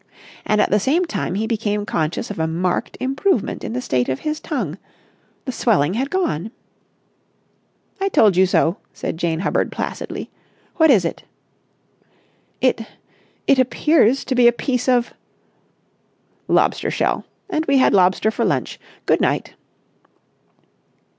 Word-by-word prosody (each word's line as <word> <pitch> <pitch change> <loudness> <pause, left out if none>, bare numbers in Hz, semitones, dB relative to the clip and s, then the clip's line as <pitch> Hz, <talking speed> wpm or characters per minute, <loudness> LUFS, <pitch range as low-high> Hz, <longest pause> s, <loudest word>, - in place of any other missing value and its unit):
And 215 0 +2
at - - +2
the 210 - +4
same 310 - +1
time 305 - -3
he 215 +3 -1
became 210 -2 -1
conscious 165 +5 -2
of 200 - -7
a 160 - +1
marked 175 +2 -2
improvement 270 - 0
in - - -4
the 250 - -2
state 125 - 0
of 130 - -2
his 305 0 -2
tongue. 200 - -4 0.7
The 260 - -2
swelling 200 - +1
had 260 +6 -1
gone. 225 - -1 1.5
"I 390 0 0
told 215 - +4
you 190 +1 +4
so!" 170 0 +2 0.2
said - - -4
Jane 165 -1 -1
Hubbard - - 0
placidly. - - -5 0.5
"What 320 -2 +5
is 205 -10 +5
it?" 165 - -3 1.4
"It—it 255 +2 -2
appears 265 0 +3
to 260 - -1
be 245 -1 +5
a - - +7
piece 250 +1 -2
of...." 245 -1 +2 1.3
"Lobster - - +2
shell. - - 0 0.2
And 320 -5 -2
we 275 0 +4
had 260 - +4
lobster 190 +3 +3
for - - -2
lunch. - - -1 0.3
Good - - +2
night." - - 0
225 Hz, 140 wpm, -20 LUFS, 185-270 Hz, 1.5 s, a